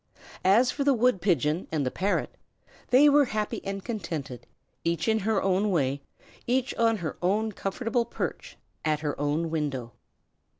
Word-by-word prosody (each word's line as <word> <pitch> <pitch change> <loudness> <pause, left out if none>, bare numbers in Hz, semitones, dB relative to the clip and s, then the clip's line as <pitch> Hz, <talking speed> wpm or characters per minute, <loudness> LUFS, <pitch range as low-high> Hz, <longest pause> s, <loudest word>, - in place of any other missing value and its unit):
As 220 +7 +5
for 285 - -2
the 275 -1 +4
wood 240 -5 +2
pigeon 165 - +1
and 150 -3 0
the 130 - -1
parrot, 200 +2 -1 0.5
they 270 +4 +6
were 290 0 +6
happy 215 -3 -3
and 195 0 -5
contented, 160 - -5 0.4
each 170 +4 -1
in 220 0 +3
her 215 0 +1
own 195 +2 +2
way, 140 -6 0 0.5
each 255 +1 +1
on 225 -1 +2
her 165 -6 -5
own 210 +5 +1
comfortable 230 +5 -1
perch, 235 - -5 0.3
at 155 -1 0
her 150 -2 -1
own 155 +3 0
window. 140 -7 -2
195 Hz, 160 wpm, -27 LUFS, 155-225 Hz, 0.5 s, they